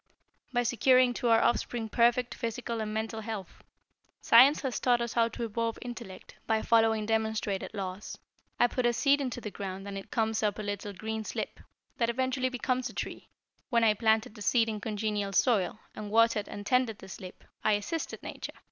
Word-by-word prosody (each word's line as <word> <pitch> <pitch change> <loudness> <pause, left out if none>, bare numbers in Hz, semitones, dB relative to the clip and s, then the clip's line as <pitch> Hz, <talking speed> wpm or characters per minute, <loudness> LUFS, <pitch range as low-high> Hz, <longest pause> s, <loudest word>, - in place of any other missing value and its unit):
"By 245 -1 +1
securing 255 +1 +4
to 245 -1 -1
our 225 0 +5
offspring 240 -1 0
perfect, 235 +2 +2
physical 230 -1 -3
and 215 -1 -3
mental 220 +1 -3
health. 215 -4 -7 0.6
Science 260 +6 +6
has 265 -4 -2
taught 245 -1 +3
us 235 -1 -3
how 230 -1 +3
to 230 +1 -6
evolve 230 0 -2
intellect 235 -6 -9
by 220 -1 +1
following 225 -2 +3
demonstrated 220 -3 -1
laws. 190 0 -5 0.4
I - - +6
put 245 0 +1
a 240 - +2
seed 280 +4 +3
into 255 -3 -3
the 210 -3 -6
ground 195 0 -6
and 200 -1 -4
it 195 - -12
comes 220 -2 0
up 210 -2 0
a 215 - -4
little 205 0 -4
green 220 +3 -4
slip, - - -5 0.4
that 230 -1 +1
eventually 255 +1 0
becomes 255 0 -1
a - - -11
tree. - - -6 0.4
When 235 -2 +3
I 220 -2 +5
planted 220 0 +1
the 215 - -12
seed 225 +3 +3
in 215 -1 -4
congenial 210 -2 -2
soil, 210 -3 +2 0.2
and 210 -1 -6
watered 225 -1 +3
and 205 - -7
tended 250 -2 +2
the 190 - -12
slip, 185 -1 -10 0.2
I 215 - +3
assisted 205 +11 -3
Nature. - - -6
225 Hz, 190 wpm, -30 LUFS, 210-240 Hz, 0.6 s, Science